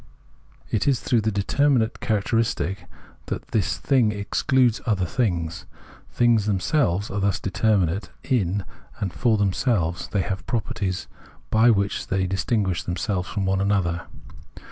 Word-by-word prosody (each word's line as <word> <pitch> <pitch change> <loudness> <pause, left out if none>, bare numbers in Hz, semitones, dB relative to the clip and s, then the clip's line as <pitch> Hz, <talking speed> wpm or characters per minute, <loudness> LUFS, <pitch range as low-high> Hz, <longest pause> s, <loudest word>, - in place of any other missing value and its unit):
It 110 - 0
is 135 -3 +3
through 120 -3 +1
the 110 +1 0
determinate 115 +4 +1
character 110 +1 0
istic 100 -4 -1 0.4
that - - -5
the 110 - +2
thing 120 +4 +1
excludes 115 +4 +1
other 100 -5 +1
things. 85 -5 -2 0.4
Things 120 -3 +3
themselves 100 - +1
are 100 - -2
thus 100 -1 +1
determinate 95 -2 +1
in 100 -5 0 0.3
and 95 -5 -2
for 110 +9 +2
them 100 -2 +1
selves; 90 -10 0
they 100 - 0
have 95 -1 -4
properties 100 -5 -2 0.5
by 110 +2 +5
which 100 -3 +1
they 95 0 0
distin 95 +3 0
guish 90 -3 -2
themselves 90 +1 -2
from 100 -2 -2
one 95 0 +1
another. 95 -4 0
100 Hz, 145 wpm, -24 LUFS, 95-115 Hz, 0.5 s, by